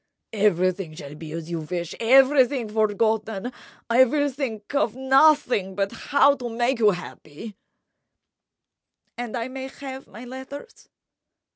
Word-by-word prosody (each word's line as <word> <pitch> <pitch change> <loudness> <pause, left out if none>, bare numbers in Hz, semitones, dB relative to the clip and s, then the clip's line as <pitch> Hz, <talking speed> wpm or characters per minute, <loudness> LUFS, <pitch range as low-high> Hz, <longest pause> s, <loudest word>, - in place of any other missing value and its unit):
"Everything 185 -4 +1
shall 145 -3 -9
be 155 +1 -9
as 165 +1 -6
you 170 - -2
wish—everything 240 - +2
forgotten—I 220 +3 0
will 285 +2 0
think 245 -5 -5
of 260 -6 +1
nothing 265 -7 +3
but 195 0 -1
how 285 0 +3
to 245 -2 -5
make 240 +2 0
you 215 -2 +5
happy—" 180 +1 -7 1.6
"And 240 0 -5
I 230 +1 -3
may 265 0 -6
have 270 0 -9
my 235 +4 -11
letters?" 265 - -10
230 Hz, 120 wpm, -24 LUFS, 195-265 Hz, 1.6 s, you